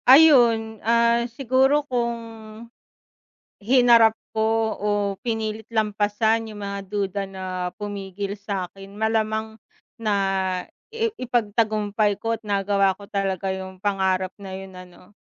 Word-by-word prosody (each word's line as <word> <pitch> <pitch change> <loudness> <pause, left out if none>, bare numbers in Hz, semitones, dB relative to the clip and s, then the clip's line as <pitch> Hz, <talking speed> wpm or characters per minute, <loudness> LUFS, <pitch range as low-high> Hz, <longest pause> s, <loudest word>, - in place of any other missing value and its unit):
Ayun, 235 -7 +6
ah, 235 +1 +2
siguro 265 +4 +2
kung, 235 -3 -1 1.5
hinarap 235 -2 +6 0.2
ko 220 0 +1
o 210 - -1 0.3
pinilit 220 -2 -3
lampasan 220 +1 +1
yung 210 - -9
mga 200 0 -4
duda 200 0 -2
na 190 -1 -8 0.4
pumigil 200 -1 -5
sakin 195 -1 -6
malamang 220 0 0 0.4
na 215 -2 0 0.8
i 455 0 0
ipagtagumpay 215 -3 0
ko 230 +1 -1
at 225 - -15
nagawa 200 -1 +2
ko 200 - -11
talaga 195 -1 -2
yung 190 0 -8
pangarap 190 -2 0
na 195 -1 -8
yun 190 -1 -9
ano. 180 +1 -14
215 Hz, 115 wpm, -23 LUFS, 200-230 Hz, 1.5 s, Ayun